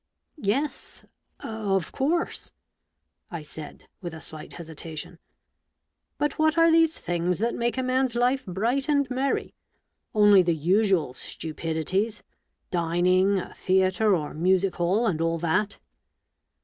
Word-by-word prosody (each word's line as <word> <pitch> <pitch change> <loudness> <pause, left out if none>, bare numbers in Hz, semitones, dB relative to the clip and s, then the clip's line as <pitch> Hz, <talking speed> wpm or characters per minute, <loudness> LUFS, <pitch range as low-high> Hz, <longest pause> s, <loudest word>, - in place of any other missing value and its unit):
" - - -50 0.2
Yes 290 +2 -5 0.2
— - - -46 0.4
of 175 - -4
course! 330 +6 -1 0.4
" - - -53
I - - -10
said, 150 0 -10
with 175 -3 -6
a - - -8
slight 155 -1 -6
hesitation, 165 0 -7 0.5
" - - -55
But 295 0 -1
what 315 +1 +3
are 330 0 +6
these 325 0 +4
things 175 0 -1
that 230 +3 0
make 235 +2 -1
a 260 - 0
man's 255 -1 +1
life 250 +3 +2
bright 235 - 0
and 285 -2 +3
merry? 265 +2 -1 0.6
Only 205 -2 +7
the 170 -2 +1
usual 180 -2 +2
stupidities 165 - -3 0.3
— - - -50
dining, 180 +3 +2
a 185 - -5
theatre 190 +2 +2
or 150 -4 -4
music 185 +3 +2
hall, 185 +7 +1
and 165 -7 0
all 165 0 +1
that 175 +6 0
190 Hz, 145 wpm, -26 LUFS, 170-245 Hz, 0.6 s, Only